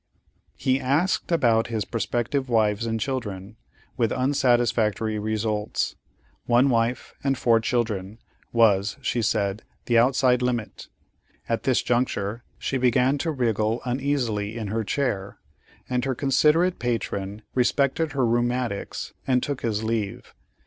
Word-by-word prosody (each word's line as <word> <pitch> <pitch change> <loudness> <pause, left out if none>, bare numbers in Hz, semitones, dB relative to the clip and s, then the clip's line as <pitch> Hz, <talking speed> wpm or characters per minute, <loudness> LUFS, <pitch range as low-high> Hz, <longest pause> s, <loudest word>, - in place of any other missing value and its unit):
He 130 0 +1
asked 145 +9 0
about 120 -9 +3
his 110 -4 -2
prospective 125 +3 -2
wives 110 -1 +2
and 115 0 -1
children, 110 -5 -4 0.4
with 115 -3 +1
unsatisfactory 120 -5 +1
results. 105 0 -1 0.5
One 125 +3 +4
wife 115 +1 0
and 135 -1 +1
four 115 -2 +3
children 110 -4 -2 0.3
was, 105 -3 +3
she 120 - 0
said, 100 -1 0 0.2
the 120 -1 +4
outside 125 0 +3
limit. 120 -3 -2 0.6
At 115 - -2
this 130 -2 +2
juncture 120 -2 -1
she 135 - -2
began 125 +3 +3
to 165 - -1
wriggle 115 -4 0
uneasily 125 -5 -1
in 110 -3 -4
her 110 +2 -1
chair, 100 -5 -2 0.5
and 125 -1 -1
her 135 -1 -1
considerate 150 +7 +3
patron 105 -3 -3
respected 140 +4 +1
her 135 -3 +1
"rheumatics" 120 -2 -1
and 125 -2 +2
took 140 -2 -3
his 110 -2 -1
leave. 110 -3 -3
120 Hz, 130 wpm, -25 LUFS, 110-130 Hz, 0.6 s, One